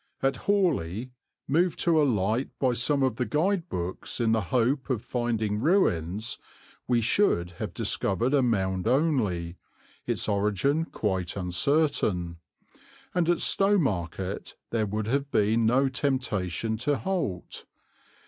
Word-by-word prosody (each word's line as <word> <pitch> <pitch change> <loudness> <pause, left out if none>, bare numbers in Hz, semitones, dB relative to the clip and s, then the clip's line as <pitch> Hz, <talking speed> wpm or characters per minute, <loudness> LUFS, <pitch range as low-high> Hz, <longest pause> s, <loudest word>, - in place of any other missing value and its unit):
At 135 0 +2
Haughley, 130 - +1 0.4
moved 170 +4 +2
to 165 -3 +3
alight 115 -2 +1
by 130 -2 +1
some 140 +4 +1
of 130 -4 0
the 125 - 0
guide 175 - 0
books 90 +6 -4
in 115 -2 +2
the 110 0 +2
hope 130 +3 +1
of 120 -4 -1
finding 115 -4 -1
ruins, 110 - +1 0.5
we 120 -2 +2
should 105 - +2
have - - -3
discovered 115 +7 0
a 140 - +4
mound 95 -6 0
only, 105 - +1 0.5
its - - -1
origin 105 - +1
quite 95 - -2
uncertain; 90 - 0 0.8
and 175 -3 +1
at 175 - +2
Stowmarket 100 - +1 0.2
there 110 -2 0
would 105 +1 -2
have 140 +5 -1
been 110 0 +2
no 130 +4 +3
temptation 115 -7 -1
to 140 +5 0
halt. 175 - -3
120 Hz, 130 wpm, -27 LUFS, 100-145 Hz, 0.8 s, a